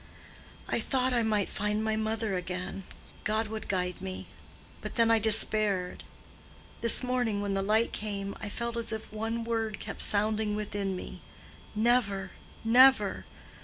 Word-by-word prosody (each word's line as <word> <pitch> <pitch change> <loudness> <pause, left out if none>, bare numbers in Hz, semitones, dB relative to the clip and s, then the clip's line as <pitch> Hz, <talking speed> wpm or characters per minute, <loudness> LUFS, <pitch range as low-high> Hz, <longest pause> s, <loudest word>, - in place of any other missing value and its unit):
I - - 0
thought 260 -1 0
I 240 - +3
might 215 -3 +1
find 210 +1 -1
my 220 0 0
mother 220 -1 -1
again—God 185 +4 -4
would 220 0 -6
guide 180 -1 -2
me. 190 0 -6 0.6
But - - -6
then 230 -1 +4
I 225 - +5
despaired. 210 -3 +2 0.8
This 230 +2 +4
morning 245 -4 0
when 200 -1 -2
the 195 - 0
light 215 +4 +1
came, 200 -2 -4
I 205 - -4
felt 235 +2 -3
as 230 -1 -1
if 220 -1 -6
one 225 +2 -2
word 225 -3 -2
kept - - -6
sounding 210 0 +3
within 205 -2 -3
me—Never! 210 +1 -2 0.3
never! 260 +4 +5
215 Hz, 140 wpm, -29 LUFS, 200-225 Hz, 0.8 s, I